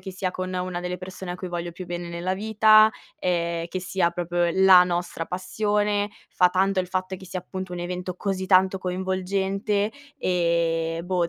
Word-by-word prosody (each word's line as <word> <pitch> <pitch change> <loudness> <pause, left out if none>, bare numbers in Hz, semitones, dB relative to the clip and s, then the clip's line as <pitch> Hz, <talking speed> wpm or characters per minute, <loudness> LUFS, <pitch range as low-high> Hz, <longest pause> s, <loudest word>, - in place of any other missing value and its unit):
che 190 - -7
sia 185 0 -2
con 185 0 -5
una 180 -1 -3
delle 180 0 -3
persone 185 0 -7
a - - -5
cui 185 0 -6
voglio 175 0 -4
più 180 +2 -8
bene 175 0 -5
nella 170 +2 -2
vita, 215 +2 +5 0.3
ehm, 170 -2 -1
che 185 - -3
sia 175 -1 0
proprio 175 0 0
la 190 -1 +8
nostra 175 -2 -2
passione. 205 +2 0 0.2
Fa 180 -1 +4
tanto 190 +1 +2
il 180 - -5
fatto 185 +1 -2
che 190 0 -12
sia, 185 0 -4
appunto, 185 0 -7
un - - -5
evento 180 +1 -4
così 190 -1 -2
tanto 190 0 +4
coinvolgente. 190 +3 -1 0.2
E, 170 - 0
boh, 180 -2 0
185 Hz, 180 wpm, -25 LUFS, 175-190 Hz, 0.3 s, la